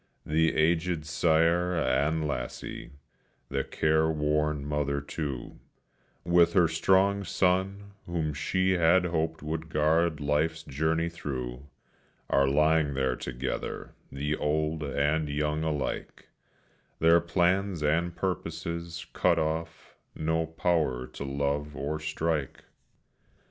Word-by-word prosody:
The 80 Hz, +1 st, +2 dB
aged 80 Hz, 0 st, +1 dB
sire 85 Hz, +3 st, +2 dB
and 75 Hz, +1 st, +1 dB
lassie; -, -, -5 dB, 0.6 s
the 70 Hz, -1 st, -1 dB
careworn 75 Hz, -1 st, +1 dB
mother, 75 Hz, -1 st, -1 dB
too, 70 Hz, -3 st, -5 dB, 0.7 s
With 85 Hz, 0 st, +4 dB
her 90 Hz, -4 st, +5 dB
strong 95 Hz, +4 st, +2 dB
son, 95 Hz, +2 st, 0 dB, 0.2 s
whom 80 Hz, -3 st, -1 dB
she 95 Hz, +5 st, 0 dB
had 90 Hz, +1 st, +4 dB
hoped 80 Hz, -2 st, -1 dB
would 80 Hz, +1 st, -4 dB
guard 80 Hz, +1 st, +2 dB
life's 75 Hz, +2 st, 0 dB
journey 80 Hz, +4 st, 0 dB
thro', 70 Hz, -5 st, -5 dB, 0.6 s
Are 70 Hz, 0 st, +4 dB
lying 75 Hz, 0 st, +3 dB
there 65 Hz, -2 st, +1 dB
together, 65 Hz, +1 st, -5 dB, 0.2 s
the 75 Hz, +2 st, -2 dB
old 75 Hz, +1 st, -1 dB
and 75 Hz, +2 st, 0 dB
young 75 Hz, +1 st, -1 dB
alike; 75 Hz, -3 st, -3 dB, 0.7 s
Their 85 Hz, +1 st, +5 dB
plans 90 Hz, 0 st, +1 dB
and 85 Hz, +3 st, +1 dB
purposes 85 Hz, -1 st, -4 dB
cut -, -, +3 dB
off, 80 Hz, +1 st, -3 dB, 0.2 s
no 80 Hz, +1 st, 0 dB
power 80 Hz, -6 st, 0 dB
to 70 Hz, -, -8 dB
love 70 Hz, +2 st, -2 dB
or 75 Hz, +2 st, -3 dB
strike. 75 Hz, -2 st, -2 dB
80 Hz, 110 wpm, -28 LUFS, 75-85 Hz, 0.7 s, her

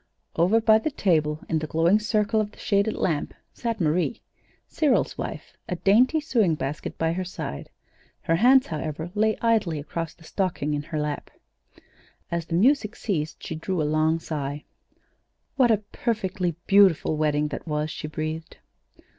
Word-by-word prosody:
Over 185 Hz, +7 st, +4 dB
by 220 Hz, -1 st, +5 dB
the 310 Hz, -, -1 dB
table 155 Hz, -, +1 dB
in 160 Hz, -, 0 dB
the 155 Hz, -, -4 dB
glowing 165 Hz, +7 st, +3 dB
circle 215 Hz, 0 st, +1 dB
of 210 Hz, -1 st, -4 dB
the -, -, -19 dB
shaded 200 Hz, +1 st, +1 dB
lamp, 155 Hz, -5 st, -1 dB, 0.2 s
sat 230 Hz, -2 st, -3 dB
Marie, 175 Hz, +7 st, 0 dB, 0.5 s
Cyril's 295 Hz, -5 st, +1 dB
wife, -, -, -6 dB, 0.2 s
a 180 Hz, -, -1 dB
dainty 235 Hz, -, +4 dB
sewing 225 Hz, -, +2 dB
basket 145 Hz, 0 st, -5 dB
by 160 Hz, 0 st, +1 dB
her 185 Hz, +2 st, -2 dB
side. 175 Hz, -, -6 dB, 0.5 s
Her 165 Hz, -, +1 dB
hands, 255 Hz, +6 st, +6 dB
however, 160 Hz, +1 st, -4 dB
lay 215 Hz, 0 st, +2 dB
idly 215 Hz, -9 st, +2 dB
across 160 Hz, +2 st, -5 dB
the 165 Hz, -, -19 dB
stocking 165 Hz, -4 st, -2 dB
in 145 Hz, -, -1 dB
her 155 Hz, +1 st, -4 dB
lap. 150 Hz, -1 st, -3 dB, 1.0 s
As 170 Hz, -1 st, -2 dB
the 165 Hz, -, -2 dB
music 225 Hz, +2 st, +3 dB
ceased, 160 Hz, -7 st, -3 dB
she -, -, -4 dB
drew 170 Hz, +3 st, -3 dB
a -, -, +2 dB
long 155 Hz, +2 st, +2 dB
sigh. 145 Hz, -3 st, -4 dB, 0.9 s
What 260 Hz, -3 st, +4 dB
a 220 Hz, -, +5 dB
perfectly 190 Hz, -7 st, -1 dB
beautiful 195 Hz, -6 st, +4 dB
wedding 150 Hz, -1 st, +1 dB
that 150 Hz, -, -7 dB
was! 150 Hz, 0 st, -1 dB
she 150 Hz, -, -6 dB
breathed. 155 Hz, +1 st, -5 dB
170 Hz, 165 wpm, -25 LUFS, 155-215 Hz, 1.0 s, hands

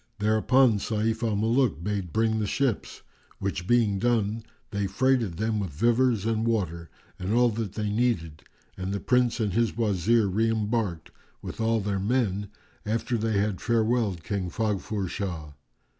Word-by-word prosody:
[FN#397] 105 Hz, -, -12 dB
Thereupon 115 Hz, +4 st, +4 dB
Sayf 110 Hz, +2 st, -1 dB
al 110 Hz, -, 0 dB
Muluk 110 Hz, -, +1 dB
bade 100 Hz, -3 st, -2 dB
bring 110 Hz, +2 st, +1 dB
the 105 Hz, -, -1 dB
ships; 130 Hz, 0 st, -1 dB, 0.3 s
which 95 Hz, -2 st, -3 dB
being 110 Hz, -4 st, +3 dB
done, 115 Hz, -2 st, +1 dB, 0.3 s
they 100 Hz, -2 st, -1 dB
freighted 115 Hz, -3 st, +1 dB
them 110 Hz, 0 st, 0 dB
with 95 Hz, -3 st, -2 dB
vivers 115 Hz, -, +2 dB
and 110 Hz, -1 st, 0 dB
water 85 Hz, -8 st, -1 dB, 0.3 s
and 95 Hz, +2 st, -3 dB
all 120 Hz, 0 st, +5 dB
that 110 Hz, -3 st, -4 dB
they 105 Hz, 0 st, -2 dB
needed, 105 Hz, -9 st, 0 dB, 0.3 s
and 95 Hz, +1 st, -4 dB
the 100 Hz, -, -1 dB
Prince 125 Hz, +1 st, +2 dB
and 105 Hz, -4 st, 0 dB
his 115 Hz, +1 st, +1 dB
Wazir 110 Hz, 0 st, +2 dB
re 110 Hz, +4 st, +1 dB
embarked, 110 Hz, -6 st, -1 dB, 0.3 s
with -, -, -6 dB
all 115 Hz, 0 st, +2 dB
their 100 Hz, -1 st, -1 dB
men, 105 Hz, -2 st, 0 dB, 0.4 s
after 115 Hz, +3 st, -1 dB
they 110 Hz, -2 st, 0 dB
had 100 Hz, -1 st, 0 dB
farewelled 115 Hz, -6 st, +1 dB
King 100 Hz, -2 st, -2 dB
Faghfur 105 Hz, 0 st, -2 dB
Shah. 85 Hz, -6 st, -4 dB
110 Hz, 160 wpm, -27 LUFS, 100-115 Hz, 0.4 s, all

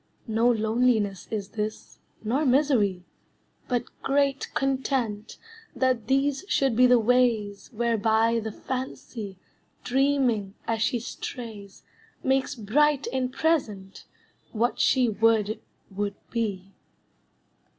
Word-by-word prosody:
No 225 Hz, +1 st, +2 dB
loneliness 220 Hz, -3 st, +1 dB
is 205 Hz, -3 st, -4 dB
this, 215 Hz, 0 st, -5 dB, 0.2 s
nor 250 Hz, +8 st, 0 dB
misery, 250 Hz, -10 st, +2 dB, 0.6 s
But 245 Hz, -2 st, 0 dB, 0.2 s
great 275 Hz, 0 st, +1 dB
content 260 Hz, -6 st, -1 dB, 0.4 s
that 255 Hz, -4 st, +1 dB
these 275 Hz, +3 st, +1 dB
should 270 Hz, -4 st, +2 dB
be 250 Hz, +2 st, +6 dB
the 250 Hz, 0 st, +6 dB
ways 225 Hz, -4 st, +1 dB
Whereby 230 Hz, 0 st, +2 dB
the 220 Hz, 0 st, -4 dB
Fancy, 230 Hz, -5 st, -6 dB, 0.5 s
dreaming 250 Hz, -6 st, +1 dB
as 225 Hz, -1 st, -1 dB
she 240 Hz, +2 st, +1 dB
strays, 220 Hz, -3 st, -8 dB, 0.4 s
Makes 265 Hz, 0 st, +1 dB
bright 275 Hz, +6 st, +2 dB
and 255 Hz, -1 st, -1 dB
present 215 Hz, -12 st, -1 dB, 0.5 s
what 235 Hz, +2 st, 0 dB
she 255 Hz, -2 st, +4 dB
would 220 Hz, -1 st, +2 dB, 0.3 s
would 200 Hz, +1 st, -3 dB, 0.2 s
be. 200 Hz, -5 st, -3 dB
230 Hz, 105 wpm, -26 LUFS, 210-260 Hz, 0.6 s, be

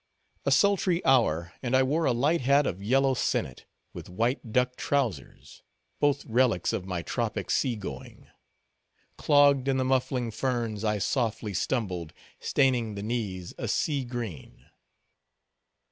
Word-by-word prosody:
A -, -, +3 dB
sultry 190 Hz, -3 st, +2 dB
hour, 85 Hz, -10 st, +2 dB
and 130 Hz, 0 st, 0 dB
I 130 Hz, -, +5 dB
wore 155 Hz, +5 st, 0 dB
a -, -, +3 dB
light 145 Hz, +7 st, +1 dB
hat, 140 Hz, +3 st, +3 dB
of 90 Hz, -, -3 dB
yellow 135 Hz, +6 st, +2 dB
sinnet, 65 Hz, -, -2 dB, 0.3 s
with -, -, -9 dB
white 115 Hz, +5 st, -2 dB
duck 125 Hz, +1 st, +1 dB
trowsers—both 140 Hz, -, -3 dB
relics 115 Hz, -6 st, +1 dB
of 95 Hz, -, -3 dB
my 90 Hz, -3 st, -3 dB
tropic -, -, -3 dB
sea 125 Hz, -3 st, +1 dB
going. 105 Hz, -3 st, -9 dB, 0.9 s
Clogged 145 Hz, -3 st, +4 dB
in 135 Hz, -1 st, +2 dB
the 130 Hz, -, 0 dB
muffling 130 Hz, -2 st, 0 dB
ferns, 115 Hz, -3 st, -2 dB
I 105 Hz, -1 st, +1 dB
softly 110 Hz, -1 st, -1 dB
stumbled, 90 Hz, -6 st, -2 dB, 0.3 s
staining 125 Hz, -6 st, +1 dB
the 100 Hz, -, -5 dB
knees 105 Hz, -6 st, -4 dB
a -, -, -3 dB
sea 145 Hz, -4 st, 0 dB
green. 120 Hz, -, -7 dB
120 Hz, 135 wpm, -27 LUFS, 105-135 Hz, 0.9 s, I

